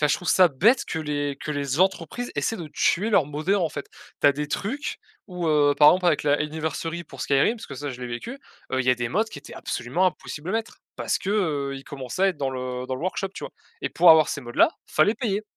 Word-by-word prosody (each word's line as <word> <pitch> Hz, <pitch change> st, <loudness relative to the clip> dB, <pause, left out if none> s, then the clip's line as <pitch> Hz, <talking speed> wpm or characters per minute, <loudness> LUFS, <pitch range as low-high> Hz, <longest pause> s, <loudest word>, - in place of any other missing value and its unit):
enfin, 150 Hz, -, +4 dB
je -, -, +3 dB
trouve 180 Hz, -, -5 dB
ça 185 Hz, -, +6 dB
bête 210 Hz, -, +3 dB
que 160 Hz, -, -4 dB
les 145 Hz, -2 st, -2 dB
que 155 Hz, -, -6 dB
les 140 Hz, -1 st, -2 dB
entreprises 195 Hz, +6 st, 0 dB
essaient 225 Hz, -, 0 dB
de 165 Hz, -4 st, -7 dB
tuer 210 Hz, +6 st, +1 dB
leur 165 Hz, -8 st, +4 dB
moddeur, 155 Hz, +7 st, 0 dB
en 165 Hz, -, +1 dB
fait, 145 Hz, -1 st, -7 dB, 0.3 s
tu -, -, +4 dB
as -, -, +4 dB
des 150 Hz, +2 st, -3 dB
trucs 265 Hz, -, -3 dB, 0.3 s
ou 180 Hz, -2 st, -4 dB
heu, 145 Hz, -2 st, +4 dB
par 150 Hz, +1 st, +8 dB
exemple, 180 Hz, 0 st, +1 dB
avec 160 Hz, -4 st, +3 dB
la 145 Hz, -, +3 dB
Anniversary 160 Hz, +2 st, -3 dB
pour -, -, -12 dB
Skyrim, 145 Hz, -, +2 dB
parce -, -, -10 dB
que 140 Hz, -, -8 dB
ça 145 Hz, +2 st, -5 dB
je 125 Hz, -1 st, -9 dB
l'ai 125 Hz, -, -4 dB
vécu, 175 Hz, -, -6 dB, 0.3 s
heu, 130 Hz, -, +1 dB
il 125 Hz, -, -3 dB
y -, -, +6 dB
a -, -, +4 dB
des 120 Hz, -1 st, -3 dB
mods 215 Hz, -, +1 dB
qui 220 Hz, -, -10 dB
étaient 140 Hz, -, -12 dB
absolument 145 Hz, +11 st, -1 dB
impossible 160 Hz, 0 st, -4 dB
à -, -, -2 dB
mettre 225 Hz, 0 st, -3 dB, 0.2 s
parce -, -, -1 dB
que 195 Hz, -, -4 dB
heu, 150 Hz, -9 st, 0 dB
ils 135 Hz, -, -10 dB
commençaient 140 Hz, +6 st, -5 dB
à -, -, +5 dB
être 185 Hz, -, -2 dB
dans 135 Hz, -2 st, -2 dB
le 125 Hz, -1 st, -4 dB
dans 130 Hz, -, -2 dB
le 130 Hz, -, -7 dB
workshop, 185 Hz, +3 st, -2 dB
tu -, -, -8 dB
vois? -, -, -7 dB, 0.3 s
Et -, -, -2 dB
pour 180 Hz, -, +4 dB
avoir 155 Hz, -1 st, +7 dB
ces -, -, -3 dB
mods 120 Hz, -2 st, -9 dB
là -, -, +5 dB, 0.2 s
fallait 205 Hz, +8 st, +3 dB
payer, 215 Hz, -5 st, -2 dB
155 Hz, 270 wpm, -24 LUFS, 140-185 Hz, 0.3 s, par